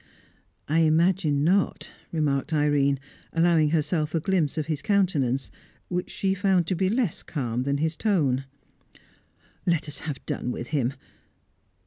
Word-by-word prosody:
"I 155 +3 +2
imagine 160 -2 +3
not," 190 +4 +1 0.2
remarked 150 -1 0
Irene, 145 -2 +2 0.3
allowing 165 -2 +4
herself 155 0 0
a - - +3
glimpse 165 -3 0
of 155 - 0
his 155 -3 -2
countenance, 155 - +1 0.4
which 180 0 -2
she 190 -1 0
found 190 -3 +2
to 185 - -1
be 185 +2 +1
less 225 -5 0
calm 125 -5 -3
than 140 +2 0
his 160 +2 -1
tone. 145 - +1 1.2
"Let 170 -3 +1
us 145 -2 -7
have 150 -5 -6
done - - -3
with 120 - -6
him. 135 -3 0
155 Hz, 140 wpm, -26 LUFS, 140-180 Hz, 1.2 s, allowing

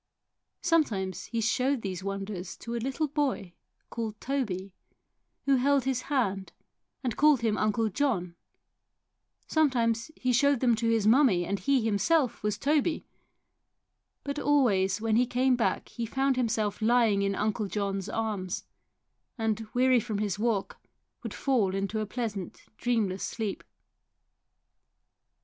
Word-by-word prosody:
Sometimes 225 - +1
he 230 -1 -2
showed 255 +3 +1
these 190 -2 -4
wonders 195 -2 -5
to 235 - -7
a 235 - -2
little 270 +5 -1
boy 270 - -2 0.4
called 220 -2 -4
Toby, 200 -9 -3 0.7
who 275 -1 +4
held 275 +1 +3
his 260 -1 -1
hand 200 -9 -1 0.5
and 245 -4 -1
called 295 -4 +4
him 220 -2 +1
Uncle 215 +1 +1
John, 210 -8 -1 1.1
sometimes 240 -6 +1
he 255 -1 0
showed 280 +2 +3
them 245 -2 +3
to 230 +1 0
his 225 -2 +2
mummie 220 -7 +4
and 200 +3 -2
he 275 -4 +2
himself 250 +6 +1
was 210 -1 -1
Toby; 300 +3 +1 1.2
but 280 +1 -3
always 210 -11 +2
when 220 0 +1
he 245 +1 +3
came 255 +1 +2
back 240 - -1
he 235 -2 -4
found 270 +3 +1
himself 220 -4 -1
lying 225 -3 +3
in 200 0 0
Uncle 210 0 -1
John's 195 -1 -2
arms, 205 -5 -3 0.7
and, 225 -1 -1
weary 255 0 +4
from 220 -3 -3
his 205 -2 -2
walk, 220 -3 -1 0.4
would - - -6
fall 225 -9 +1
into 200 +3 -2
a 215 - -2
pleasant 210 -5 -5 0.2
dreamless 220 -6 0
sleep. 220 -4 -3
225 Hz, 135 wpm, -28 LUFS, 200-260 Hz, 1.2 s, who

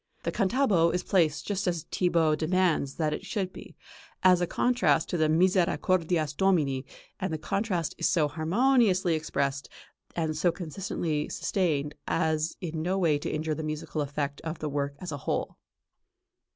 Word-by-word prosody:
The - - -1
"cantabo" 195 -5 +2
is 180 - -1
placed 160 -6 +1
just 200 -1 -2
as 170 -3 -1
Thibaut 165 -4 +2
demands 165 -4 +1
that 155 -2 0
it - - -5
should 190 -4 -3
be, - - -11 0.5
as 180 -1 +6
a 175 - +1
contrast 245 -6 +2
to 175 - -1
the 155 -1 +3
"Misercordias 170 -2 +2
Domini 145 -9 +1 0.3
and 185 - -2
the 160 - -1
contrast 185 -1 -1
is - - +2
so 160 -5 +3
harmoniously 190 - +2
expressed 140 -3 -2 0.5
and 160 -2 -1
so 170 +3 +2
consistently 165 -3 -3
sustained 150 -6 -1
as 160 0 0
in 165 -3 -3
no 185 +4 0
way 160 -6 +2
to - - -4
injure 155 0 -1
the 155 - -4
musical 155 0 -3
effect 145 0 -3
of 160 0 -5
the 155 -1 -3
work 140 0 -2
as 180 - -6
a 145 - -3
whole. - - -2
165 Hz, 165 wpm, -28 LUFS, 155-185 Hz, 0.5 s, as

